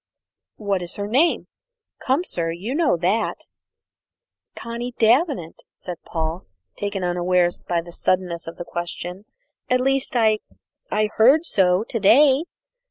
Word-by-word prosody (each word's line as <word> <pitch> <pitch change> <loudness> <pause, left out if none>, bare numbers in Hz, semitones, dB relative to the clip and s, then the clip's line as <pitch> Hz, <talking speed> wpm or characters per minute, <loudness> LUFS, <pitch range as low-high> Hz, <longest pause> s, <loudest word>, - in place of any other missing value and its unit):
"What 200 -3 -1
is 175 -1 -7
her 200 - -3
name? 270 +11 +2 0.6
Come, 270 +6 +1
sir, 170 - -3
you 185 +9 -4
know 305 - +2
that." 185 +7 -1 1.1
"Connie 235 +1 -6
Davenant," 235 - +2
said 180 -2 -8
Paul, 160 +2 -4 0.3
taken 200 -2 -3
unawares 175 0 +1
by 170 -1 -1
the 170 +1 -12
suddenness 180 -1 -1
of 165 - -8
the 175 - -6
question. 175 +3 -5 0.4
"At 255 - +3
least, 270 0 0
I 220 -2 +3 0.5
I 215 0 0
heard 275 +9 +5
so 185 - +2
to 230 - -3
day." 270 - +5
200 Hz, 135 wpm, -22 LUFS, 175-250 Hz, 1.1 s, heard